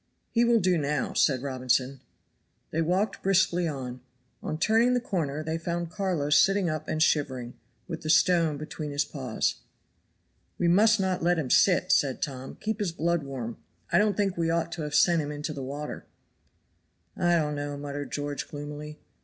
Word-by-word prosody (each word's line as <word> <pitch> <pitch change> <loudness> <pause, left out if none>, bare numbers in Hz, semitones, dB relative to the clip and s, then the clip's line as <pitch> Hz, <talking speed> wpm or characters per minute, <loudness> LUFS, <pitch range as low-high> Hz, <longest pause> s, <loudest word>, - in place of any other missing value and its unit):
"He 235 - +3
will 235 -1 +4
do 180 -3 +2
now," 145 -1 -1
said 130 -3 +2
Robinson. 130 0 0 0.7
They 165 - 0
walked 185 +5 0
briskly 180 -2 +2
on. 130 -4 -5 0.4
On 155 - -3
turning 225 +8 +3
the - - +2
corner 155 - -2
they 160 +1 -2
found 170 0 -3
Carlo 180 -8 -1
sitting 195 +1 +4
up 155 0 -4
and 155 0 +1
shivering, 130 -6 0 0.3
with 165 -3 -5
the 155 - -5
stone 165 -2 +4
between 155 0 -6
his 145 0 0
paws. 130 -7 -2 1.0
"We 175 - +1
must 215 +5 +5
not 190 -1 0
let 175 +1 +2
him 140 -6 -2
sit," 185 -1 +4
said 140 -7 +2
Tom; 130 -2 -5
"keep 220 0 -2
his 200 -5 -1
blood 170 +1 0
warm. 130 -5 -6 0.3
I 175 - +5
don't 210 -1 +2
think 195 -3 +1
we 165 -1 +1
ought 165 0 0
to 170 - -5
have 150 -1 -3
sent 170 +2 +4
him 145 0 -4
into 150 +1 -4
the 140 - -6
water." 145 +3 -6 1.1
"I 175 0 +2
don't 150 -3 +1
know," 145 0 -4
muttered 145 0 -5
George, 145 -1 -3
gloomily. 150 +1 -7
155 Hz, 180 wpm, -27 LUFS, 145-180 Hz, 1.1 s, must